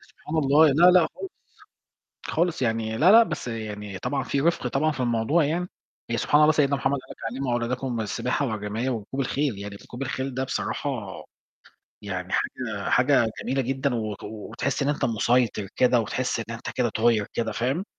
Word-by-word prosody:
سبحان 155 Hz, +2 st, -8 dB
الله، 150 Hz, +1 st, +5 dB
لأ، 175 Hz, +6 st, +7 dB
لأ 175 Hz, -3 st, +5 dB
خالص. 385 Hz, -, -6 dB, 1.0 s
خالص 170 Hz, -4 st, 0 dB
يعني، 110 Hz, -1 st, -1 dB
لأ، 180 Hz, -, +6 dB
لأ، 230 Hz, -, +9 dB
بس 175 Hz, -, -4 dB
يعني 105 Hz, -4 st, -5 dB
طبعًا 135 Hz, +6 st, -2 dB
في 140 Hz, +2 st, -1 dB
رِفق 170 Hz, -4 st, +1 dB
طبعًا 155 Hz, +5 st, +1 dB
في 135 Hz, -, -7 dB
الموضوع 120 Hz, +7 st, +2 dB
يعني، 175 Hz, +5 st, -1 dB, 0.4 s
يعني 115 Hz, -1 st, -1 dB
سبحان 150 Hz, +6 st, +3 dB
الله 155 Hz, +1 st, +6 dB
سيدنا 140 Hz, -2 st, +2 dB
محمد 140 Hz, +1 st, 0 dB
قال -, -, -20 dB
لك -, -, -9 dB, 0.2 s
علّموا 130 Hz, -1 st, -2 dB
أولادكم 120 Hz, 0 st, -2 dB
السباحة 125 Hz, +6 st, -1 dB
والرماية 110 Hz, +3 st, -2 dB
وركوب 120 Hz, +4 st, -4 dB
الخيل، 135 Hz, -4 st, -1 dB
يعني 100 Hz, 0 st, -7 dB
ركوب 125 Hz, +5 st, -9 dB
الخيل 130 Hz, 0 st, -3 dB
ده 130 Hz, -, -1 dB
بصراحة 140 Hz, +2 st, -2 dB, 1.1 s
يعني 95 Hz, -3 st, -4 dB
حاجة 110 Hz, -6 st, -2 dB
حاجة 125 Hz, -3 st, +4 dB
جميلة 135 Hz, 0 st, 0 dB
جدًا 135 Hz, +1 st, -1 dB
و 110 Hz, -3 st, -2 dB
وتحس 110 Hz, +6 st, -3 dB
إن 140 Hz, -, 0 dB
أنت 145 Hz, -1 st, 0 dB
مُسيطر 115 Hz, -3 st, +1 dB
كده، 125 Hz, -1 st, +4 dB
وتحس 120 Hz, +3 st, -2 dB
إن 115 Hz, +1 st, -6 dB
أنت 115 Hz, -, -6 dB
كده 125 Hz, -1 st, 0 dB
طاير 110 Hz, -1 st, +2 dB
كده، 115 Hz, -1 st, -1 dB
فاهم؟ 130 Hz, +11 st, -1 dB
125 Hz, 180 wpm, -25 LUFS, 110-140 Hz, 1.1 s, لأ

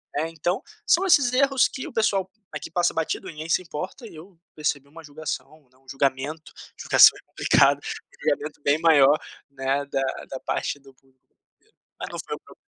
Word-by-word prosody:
né, 160 Hz, +3 st, -1 dB
então 170 Hz, +3 st, -2 dB, 0.2 s
são 375 Hz, +3 st, +4 dB
esses 280 Hz, -9 st, +4 dB
erros 270 Hz, 0 st, +4 dB
que 265 Hz, -, -7 dB
o -, -, -11 dB
pessoal 195 Hz, -4 st, +1 dB, 0.2 s
aqui -, -, -7 dB
passa 175 Hz, 0 st, +1 dB
batido 160 Hz, -, -2 dB
ninguém 155 Hz, +1 st, -7 dB
se -, -, +3 dB
importa 185 Hz, -, -7 dB
e 165 Hz, -, -13 dB
eu 170 Hz, +2 st, -14 dB, 0.2 s
percebi 145 Hz, -2 st, -2 dB
uma 165 Hz, +3 st, -13 dB
julgação, 150 Hz, -1 st, -7 dB
né, 130 Hz, -, -28 dB
um 135 Hz, 0 st, -31 dB
julgamento, 140 Hz, +3 st, -2 dB, 0.3 s
julgação -, -, +7 dB
é -, -, -18 dB
complicado, -, -, +3 dB, 0.4 s
julgamento 150 Hz, -1 st, -2 dB
bem 145 Hz, +2 st, +2 dB
maior, 150 Hz, -3 st, +5 dB, 0.3 s
né, 135 Hz, +1 st, -1 dB
da 135 Hz, -1 st, -2 dB, 0.3 s
da 135 Hz, -, -6 dB
parte 145 Hz, -, -3 dB
do 135 Hz, -1 st, -18 dB
pu 135 Hz, -, -32 dB, 0.5 s
eiro, 435 Hz, -, -35 dB, 0.2 s
mas -, -, -5 dB
não -, -, -7 dB
foi 445 Hz, -, -4 dB
um -, -, -13 dB
proble -, -, -18 dB
155 Hz, 190 wpm, -24 LUFS, 140-185 Hz, 0.5 s, julgação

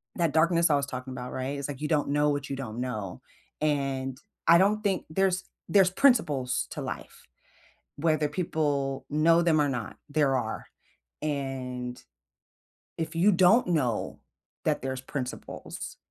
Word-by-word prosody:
that 170 Hz, -4 st, +1 dB
darkness 170 Hz, +1 st, +4 dB
I 150 Hz, -, +4 dB
was 140 Hz, -1 st, +1 dB
talking 130 Hz, 0 st, -6 dB
about, 125 Hz, -1 st, -6 dB
right? 130 Hz, +2 st, -3 dB
It's 140 Hz, -, -3 dB
like 140 Hz, -2 st, -5 dB
you 150 Hz, -, -1 dB
don't 150 Hz, -3 st, +1 dB
know 145 Hz, +1 st, +3 dB
what 145 Hz, -1 st, -2 dB
you 140 Hz, -, -2 dB
don't 120 Hz, -3 st, -5 dB
know, 105 Hz, -7 st, -4 dB, 0.4 s
and 135 Hz, -3 st, 0 dB, 0.3 s
I 170 Hz, -, +8 dB
don't 205 Hz, +4 st, +3 dB
think 195 Hz, -3 st, 0 dB
there's 190 Hz, +2 st, +1 dB, 0.3 s
there's 190 Hz, -2 st, +5 dB
principles 170 Hz, -, +2 dB
to -, -, -5 dB
life, -, -, -7 dB, 0.7 s
whether 155 Hz, -1 st, +1 dB
people 145 Hz, -6 st, -1 dB
know 165 Hz, +3 st, +4 dB
them 165 Hz, -2 st, +3 dB
or 145 Hz, -, +3 dB
not, 125 Hz, -5 st, -4 dB
there 145 Hz, -2 st, +2 dB
are, 110 Hz, -3 st, -4 dB, 0.5 s
and 130 Hz, -4 st, -4 dB, 1.0 s
if 160 Hz, 0 st, -3 dB
you 185 Hz, +5 st, +5 dB
don't 185 Hz, +5 st, +5 dB
know 135 Hz, -10 st, 0 dB, 0.5 s
that -, -, +1 dB
there's 130 Hz, 0 st, -3 dB
principles, 130 Hz, -1 st, -6 dB
145 Hz, 155 wpm, -28 LUFS, 130-170 Hz, 1.0 s, I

